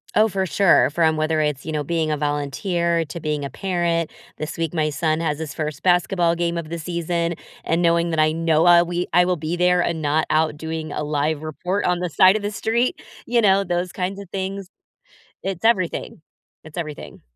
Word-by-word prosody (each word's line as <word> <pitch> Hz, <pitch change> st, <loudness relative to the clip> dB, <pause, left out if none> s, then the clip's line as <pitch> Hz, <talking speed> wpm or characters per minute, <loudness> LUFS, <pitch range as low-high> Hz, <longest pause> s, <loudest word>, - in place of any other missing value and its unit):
Oh, 215 Hz, +1 st, +5 dB
for 190 Hz, -2 st, -1 dB
sure. 195 Hz, 0 st, +4 dB
From 160 Hz, +1 st, +2 dB
whether 155 Hz, 0 st, 0 dB
it's, 150 Hz, -3 st, -1 dB
you 155 Hz, -, -4 dB
know, 150 Hz, -1 st, -1 dB
being 160 Hz, -1 st, 0 dB
a 150 Hz, -, 0 dB
volunteer 165 Hz, +4 st, -1 dB
to 165 Hz, +3 st, -7 dB
being 150 Hz, -2 st, -2 dB
a -, -, -4 dB
parent. 175 Hz, -3 st, -1 dB, 0.3 s
This 155 Hz, +2 st, -5 dB
week, 165 Hz, 0 st, -2 dB
my 155 Hz, -2 st, +1 dB
son 155 Hz, +1 st, 0 dB
has 150 Hz, -2 st, -1 dB
his 155 Hz, -3 st, -5 dB
1st 150 Hz, -2 st, -4 dB
basketball 175 Hz, -1 st, +2 dB
game 170 Hz, 0 st, -1 dB
of 165 Hz, -, -4 dB
the 170 Hz, -, -4 dB
season. 170 Hz, 0 st, -2 dB, 0.3 s
And 165 Hz, +1 st, 0 dB
knowing 170 Hz, 0 st, +2 dB
that 160 Hz, -1 st, -1 dB
I 155 Hz, 0 st, +3 dB
know, 165 Hz, 0 st, +2 dB
uh, 175 Hz, 0 st, +7 dB
we 175 Hz, +1 st, -2 dB
I 180 Hz, -, +6 dB
will 180 Hz, -1 st, 0 dB
be 155 Hz, +3 st, -3 dB
there 180 Hz, 0 st, +3 dB
and 170 Hz, -2 st, -1 dB
not 155 Hz, +1 st, +1 dB
out 155 Hz, -1 st, +1 dB
doing 160 Hz, 0 st, -5 dB
a -, -, -3 dB
live 150 Hz, +1 st, -1 dB
report 180 Hz, +6 st, -2 dB
on 180 Hz, -1 st, +1 dB
the 180 Hz, -1 st, -2 dB
side 185 Hz, +7 st, +5 dB
of 215 Hz, -, -1 dB
the 205 Hz, +1 st, -3 dB
street, 230 Hz, +4 st, 0 dB, 0.2 s
you 240 Hz, 0 st, +2 dB
know, 200 Hz, -2 st, +4 dB
those 175 Hz, -1 st, -2 dB
kinds 190 Hz, +1 st, -3 dB
of 200 Hz, -, -10 dB
things. 195 Hz, 0 st, -4 dB, 0.7 s
It's 195 Hz, +1 st, -4 dB
everything, 185 Hz, -6 st, 0 dB, 0.4 s
it's 160 Hz, +1 st, -12 dB
everything. 155 Hz, -4 st, -6 dB
170 Hz, 210 wpm, -22 LUFS, 155-180 Hz, 0.7 s, uh